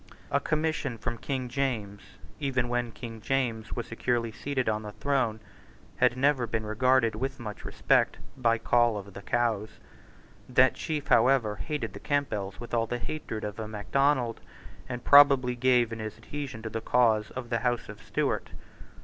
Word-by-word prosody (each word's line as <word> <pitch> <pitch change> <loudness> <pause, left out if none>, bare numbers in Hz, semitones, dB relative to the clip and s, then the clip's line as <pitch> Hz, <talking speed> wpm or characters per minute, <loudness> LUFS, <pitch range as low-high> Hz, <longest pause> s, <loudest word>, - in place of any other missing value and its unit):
A 140 - +3
commission 155 -4 -1
from 115 +1 -4
King 130 -3 -3
James, 120 -6 -2 0.4
even 130 -4 0
when 120 -1 -1
King 115 -1 -8
James 115 -3 -1
was 120 - -3
securely 115 0 -1
seated 130 +3 -2
on 110 0 +1
the 105 -1 -8
throne, 130 -6 0 0.6
had 125 - +3
never 135 -2 +2
been 110 -1 -2
regarded 115 +2 +3
with 135 +5 -3
much 105 -3 -7
respect - - +2 0.2
by 115 -3 +2
Coll 120 -1 +3
of 100 -1 -8
the 100 - -8
Cows. 110 -2 0 0.8
That 130 +1 +5
chief, 150 -3 -4
however, 115 -4 +4
hated 145 -3 -4
the - - -8
Campbells 105 -10 -2
with 120 - -9
all 115 -1 +1
the 120 - -2
hatred 120 -4 -5
of 105 +1 -5
a 110 - -4
Macdonald, 120 +3 +1 0.5
and 125 -1 -5
promptly 140 -3 +7
gave 120 -2 +3
in 115 - -6
his 110 -1 -5
adhesion 130 -1 -6
to 110 - -4
the 115 +1 -3
cause 115 -3 +3
of 125 -2 -6
the 115 - +1
House 120 0 -1
of - - -10
Stuart. - - -1
120 Hz, 170 wpm, -28 LUFS, 110-130 Hz, 0.8 s, promptly